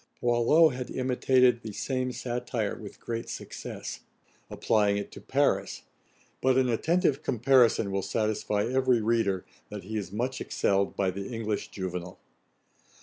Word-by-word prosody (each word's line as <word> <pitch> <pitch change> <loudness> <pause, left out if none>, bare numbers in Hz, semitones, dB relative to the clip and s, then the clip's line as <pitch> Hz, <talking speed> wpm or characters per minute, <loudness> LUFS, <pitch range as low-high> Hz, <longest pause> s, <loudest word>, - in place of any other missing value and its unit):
Boileau 120 +7 +4
had 125 -2 -5
imitated 125 -1 +2
the 110 - -6
same 130 +2 -2
satire 120 -3 -3
with 105 -2 -10
great 115 0 -5
success, - - -7 0.5
applying 105 -2 +2
it 100 - -5
to - - -11
Paris; - - 0 0.6
but 130 0 +3
an 130 -1 +3
attentive 150 - +1
comparison 120 -4 +3
will 95 0 0
satisfy 105 0 -1
every 130 0 +2
reader, 110 -4 +1 0.2
that 105 -2 -7
he 110 +4 -4
is 95 -4 -4
much 125 +5 -2
excelled 100 0 0
by 95 -2 +1
the 100 +3 -6
English 110 -3 -3
Juvenal. 90 -2 -5
115 Hz, 140 wpm, -28 LUFS, 100-125 Hz, 0.6 s, Boileau